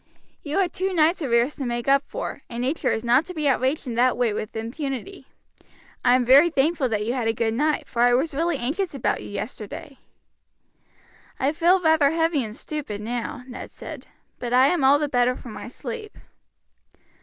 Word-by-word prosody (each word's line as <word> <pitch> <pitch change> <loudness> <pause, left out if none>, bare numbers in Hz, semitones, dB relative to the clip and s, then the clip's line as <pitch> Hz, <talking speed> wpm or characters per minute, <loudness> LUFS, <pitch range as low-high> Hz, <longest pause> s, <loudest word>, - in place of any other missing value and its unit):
"You 295 +2 -3
had 380 -3 +1
two 380 +1 -1
nights' 335 +1 +3
arrears 245 0 +2
to 275 - -3
make 240 +1 -3
up 275 0 +5
for, - - -5
and 235 0 -4
nature 275 +6 0
is 225 - -2
not 245 +5 +4
to 365 - -8
be 305 -2 0
outraged 265 +2 +1
in 245 - -4
that 245 +2 +2
way 240 -3 +1
with 215 +1 -5
impunity. 270 - -5 0.8
I 245 0 +5
am 250 -1 +2
very 280 +7 +7
thankful 295 -2 +1
that 210 -2 -1
you 235 - -1
had 245 -3 -1
a 225 - +2
good 225 0 0
night, 300 +5 0
for 235 - -2
I 245 0 +5
was 295 +5 0
really 330 +2 0
anxious 295 +8 -2
about 270 - -1
you - - -8
yesterday." 215 +5 -7 1.4
"I 270 +2 +2
feel 345 +3 +4
rather 320 -4 +4
heavy 325 -2 +1
and 215 -1 -7
stupid 275 -7 -5
now," 240 +4 -4
Ned 250 - -8
said, - - -9 0.3
"but 240 0 -3
I 260 +2 +6
am 350 -6 +1
all 275 +2 +6
the 300 0 -1
better 250 -2 +2
for 245 - -10
my 215 - -8
sleep. 430 - -7
265 Hz, 200 wpm, -24 LUFS, 240-310 Hz, 1.4 s, very